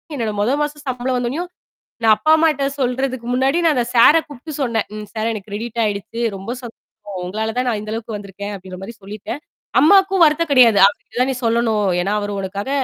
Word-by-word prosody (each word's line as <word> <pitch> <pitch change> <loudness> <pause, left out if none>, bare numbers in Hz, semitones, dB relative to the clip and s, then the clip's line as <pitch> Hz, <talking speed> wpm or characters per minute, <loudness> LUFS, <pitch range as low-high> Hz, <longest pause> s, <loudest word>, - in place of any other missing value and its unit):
என்னோட 225 -4 -2
முத 230 +5 +1
மாசம் 295 0 -5
சம்பளம் 255 0 -1
வந்தவுன்னயும், 280 +9 -3 0.5
நான் 220 -1 +6
அப்பா 310 +9 +2
அம்மாட்ட 305 -4 +2
சொல்றதுக்கு 255 -1 -1
முன்னாடி 270 +6 +2
நான் 310 -4 +4
அந்த 240 - +1
சார 235 +6 +8
கூப்பிட்டு 290 +2 -9
சொன்னேன். 230 -5 0
ம். 215 - -6
சார் 220 +1 -1
எனக்கு 210 -1 -8
கிரெடிட் 230 +3 -5
ஆயிடுச்சு. 205 +3 -4 0.2
ரொம்ப 195 +3 -9
சந்தோஷம் 210 -4 -10
உங்களால 220 +4 -3
தான் 255 - -1
நான் 215 -3 -1
இந்த 215 0 -7
அளவுக்கு 225 -1 -5
வந்திருக்கேன் 200 +1 -7
அப்பிடின்ற 185 -1 -10
மாதிரி 225 +3 -8
சொல்லிட்டேன். 210 +8 -7 0.4
அம்மாவுக்கும் 385 +2 +5
வருத்தம் 305 0 +1
கிடையாது. 235 -6 +6
அவர்கிட்ட 205 +4 -6
தான் 265 +1 +2
நீ 250 - -6
சொல்லணும். 225 -3 +1
ஏன்னா 200 +3 -1
அவரு 205 0 -3
உனக்காக 200 +6 -5
235 Hz, 190 wpm, -19 LUFS, 210-270 Hz, 0.5 s, சார